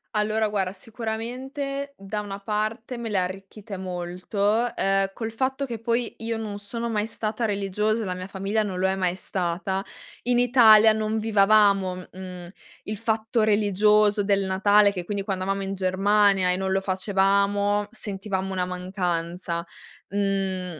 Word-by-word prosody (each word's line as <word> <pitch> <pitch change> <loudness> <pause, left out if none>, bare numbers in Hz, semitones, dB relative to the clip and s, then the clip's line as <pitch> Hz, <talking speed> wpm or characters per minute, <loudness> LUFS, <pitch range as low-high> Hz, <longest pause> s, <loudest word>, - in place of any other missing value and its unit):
Allora, 215 +1 +1
guarda 195 -2 -1
sicuramente, 255 +7 -5
da 195 +2 -4
una 200 -1 -5
parte 215 +4 -3
me 235 -1 -5
le 205 - 0
ha 185 - +3
arricchite 195 +2 -7
molto, 185 +5 -1
ehm, 195 0 +1
col 225 +1 -4
fatto 265 +4 -1
che 235 -4 -5
poi 235 +1 -1
io 230 0 -3
non 215 -2 -5
sono 230 +3 -4
mai 210 -2 0
stata 220 +1 -3
religiosa, 210 +2 0
e - - -4
la 185 - -2
mia 185 +1 -6
famiglia 195 +3 -1
non 195 -3 -3
lo 190 - +2
è 190 - +1
mai 185 -2 0
stata. 190 +1 -2 0.4
In 245 +1 +2
Italia 225 -3 +7
non 215 0 -1
vivevamo, 200 -3 +3
mhmm, 180 -1 -9 0.3
il 215 +1 -5
fatto 220 +1 0
religioso 210 0 +3
del 200 -1 +2
Natale, 200 +2 +4
che 180 -3 -5
quindi 200 +1 -3
quando 190 -2 -2
eravamo 195 0 -1
in 195 0 -3
Germania 195 0 +3
e 180 - 0
non 190 0 -1
lo 195 - +1
facevamo 200 +1 +1
sentivamo 195 -4 -3
una 185 -1 -1
mancanza. 180 -2 -3 0.4
Mhmm 195 -4 -2
200 Hz, 160 wpm, -25 LUFS, 190-220 Hz, 0.4 s, Italia